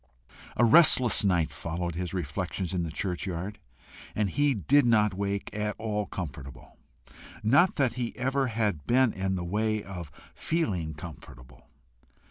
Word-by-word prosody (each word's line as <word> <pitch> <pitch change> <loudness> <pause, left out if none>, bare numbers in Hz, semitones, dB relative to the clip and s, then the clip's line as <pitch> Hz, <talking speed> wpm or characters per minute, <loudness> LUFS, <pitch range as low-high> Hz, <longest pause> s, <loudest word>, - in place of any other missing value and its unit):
A 120 - +5
restless 130 -3 +7
night 90 -5 +1
followed 85 +1 -4
his 90 0 -4
reflections 90 +2 -4
in 90 - -1
the 85 -2 -4
churchyard, 90 +3 -4 0.6
and 105 -3 0
he 145 -1 +1
did 140 - +3
not 105 -4 +3
wake 100 +1 -3
at 105 0 -3
all 105 -2 -3
comfortable. 70 -6 -8 0.7
Not 140 - +4
that 130 -5 +1 0.2
ever 135 +2 0
he 115 - -6
had 100 -10 -1
been 130 -1 +3
in 95 0 -2
the 90 -1 -4
way 110 +3 -1
of 90 -6 -8 0.2
feeling 95 - -2
comfortable. 60 -6 -12
100 Hz, 140 wpm, -27 LUFS, 85-115 Hz, 0.7 s, restless